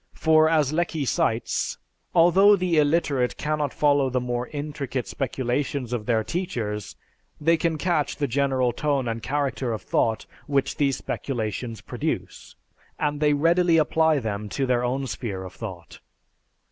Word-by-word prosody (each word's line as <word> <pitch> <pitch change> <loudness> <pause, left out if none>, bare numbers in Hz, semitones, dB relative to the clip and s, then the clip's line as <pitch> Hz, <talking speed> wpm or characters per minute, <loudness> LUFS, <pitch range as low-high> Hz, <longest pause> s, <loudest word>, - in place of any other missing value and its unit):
For 155 0 +4
as 155 -3 +2
Lecky 160 -3 -1
cites, - - 0 0.4
"Although 190 +5 +6
the 180 -4 +1
illiterate 145 -5 +1
cannot 150 -2 -1
follow 145 -2 +2
the 130 0 0
more 125 0 -3
intricate 145 -4 -4
speculations 130 -1 -2
of 110 -3 -3
their 110 -2 +2
teachers, 110 - -3 0.4
they 165 +3 +3
can 165 0 0
catch 155 -2 0
the 145 - -1
general 130 -1 +1
tone 140 -1 0
and 115 0 -3
character 135 -3 -1
of 110 - -4
thought 110 -1 0 0.2
which 140 -2 0
these 140 -3 +1
speculations 115 -2 -4
produce, - - -4 0.4
and 145 -1 -1
they 150 -1 +3
readily 165 +3 +3
apply 160 0 +3
them 105 -4 -3
to 135 - -1
their 125 -1 +1
own 130 +2 -1
sphere 100 -7 -4
of 90 -1 -9
thought." 90 -7 -9
140 Hz, 145 wpm, -25 LUFS, 120-155 Hz, 0.4 s, Although